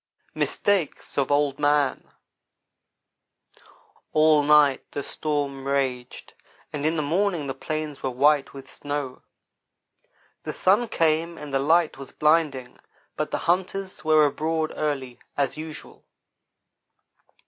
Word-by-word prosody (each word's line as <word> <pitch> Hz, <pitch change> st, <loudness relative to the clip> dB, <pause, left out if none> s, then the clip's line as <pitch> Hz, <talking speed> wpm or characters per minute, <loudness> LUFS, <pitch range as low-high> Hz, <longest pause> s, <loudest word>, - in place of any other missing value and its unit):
MISTAKES 200 Hz, -7 st, -1 dB
OF 140 Hz, 0 st, 0 dB
OLD 145 Hz, -1 st, +1 dB
MAN 145 Hz, -2 st, +1 dB, 2.0 s
ALL 155 Hz, -1 st, +5 dB
night 145 Hz, -2 st, +4 dB
the 145 Hz, -, -3 dB
storm 140 Hz, -3 st, -3 dB
raged, 130 Hz, -3 st, -2 dB, 0.4 s
and 150 Hz, 0 st, -1 dB
in 160 Hz, -, 0 dB
the 155 Hz, -, 0 dB
morning 175 Hz, +1 st, 0 dB
the 135 Hz, -, -3 dB
plains 155 Hz, +1 st, -5 dB
were 135 Hz, -, -1 dB
white 140 Hz, +3 st, +2 dB
with 135 Hz, -1 st, -11 dB
snow. 145 Hz, -3 st, -5 dB, 1.2 s
The -, -, -5 dB
sun 205 Hz, +6 st, +2 dB
came 165 Hz, -1 st, 0 dB
and 150 Hz, -2 st, -8 dB
the 135 Hz, -, +2 dB
light 160 Hz, +1 st, +2 dB
was 135 Hz, -, -9 dB
blinding, 150 Hz, -5 st, +1 dB, 0.4 s
but -, -, -2 dB
the -, -, -1 dB
hunters 185 Hz, +2 st, -1 dB
were 155 Hz, -1 st, +5 dB
abroad 155 Hz, +2 st, -1 dB
early, 135 Hz, -5 st, -3 dB, 0.2 s
as 140 Hz, -2 st, 0 dB
usual. 155 Hz, 0 st, -9 dB
150 Hz, 120 wpm, -25 LUFS, 140-160 Hz, 2.0 s, ALL